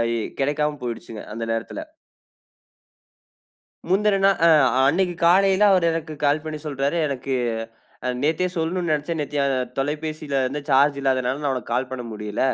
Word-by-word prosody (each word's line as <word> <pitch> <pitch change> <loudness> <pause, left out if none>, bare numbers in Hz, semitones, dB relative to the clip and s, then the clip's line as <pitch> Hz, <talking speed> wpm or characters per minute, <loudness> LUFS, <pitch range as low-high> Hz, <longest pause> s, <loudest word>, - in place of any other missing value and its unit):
இ - - 0 0.2
கிடைக்காம 150 +2 0
போய்டுச்சுங்க 115 -2 -6
அந்த 115 +1 -4
நேரத்துல. 115 - -3 2.1
முந்துன 200 +1 +3
நாள் - - +7 0.2
அ - - +7 0.4
அன்னைக்கு 175 +3 +1
காலையில 190 +3 +5
அவரு 180 -3 +3
எனக்கு 160 -1 -4
கால் 145 +2 +2
பண்ணி 155 -1 -5
சொல்றாரு. 140 +2 -1
எனக்கு 135 -1 -3 0.7
அ - - 0
நேத்தே 160 +4 +1
சொல்லணுனு 170 +1 -1
நெனைச்சேன். 150 +2 -1
நேத்தி 145 0 -4
அ - - +2 0.3
தொலைபேசிலருந்து 145 -1 -2
சார்ஜ் 140 +1 +4
இல்லாதனால 130 +1 0
நான் 140 -2 +1
உனக்கு 120 -2 -5
கால் 130 +1 -1
பண்ண 125 -2 -5
முடில. 105 -1 -5
145 Hz, 145 wpm, -23 LUFS, 130-165 Hz, 2.1 s, நாள்